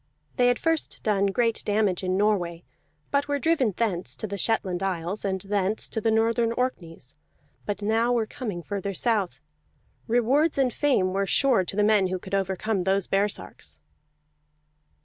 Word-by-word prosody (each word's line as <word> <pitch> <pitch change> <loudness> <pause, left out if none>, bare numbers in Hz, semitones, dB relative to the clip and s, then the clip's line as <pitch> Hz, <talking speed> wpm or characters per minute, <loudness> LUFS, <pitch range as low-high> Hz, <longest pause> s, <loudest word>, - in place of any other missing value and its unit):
They 245 -2 +4
had 245 -1 +3
first 325 -1 -1
done 200 -2 +2
great 230 +3 0
damage 205 -3 +1
in 185 0 0
Norway, 180 -5 0 0.5
but 285 0 +1
were 285 0 0
driven 285 -6 +2
thence 175 - -1
to - - -5
the 200 -1 -4
Shetland 195 -3 0
Isles, 185 +1 -2
and 190 -1 -1
thence 200 +1 -1
to 220 - -3
the 225 - +1
northern 230 +1 +2
Orkneys, 165 - -4 0.5
but 205 0 -3
now 225 +3 +2
were 235 -2 +1
coming 210 -7 -6
further 200 0 -4
south. 210 -4 0 0.7
Rewards 260 +8 +2
and 260 -3 +2
fame 220 -11 +1
were 195 0 0
sure 245 +1 +3
to 190 - -5
the 210 - +2
men 210 -2 +4
who 185 0 -2
could 190 +2 -11
overcome 195 +1 0
those 195 0 +1
baresarks. 195 - -2
205 Hz, 165 wpm, -26 LUFS, 190-235 Hz, 0.7 s, They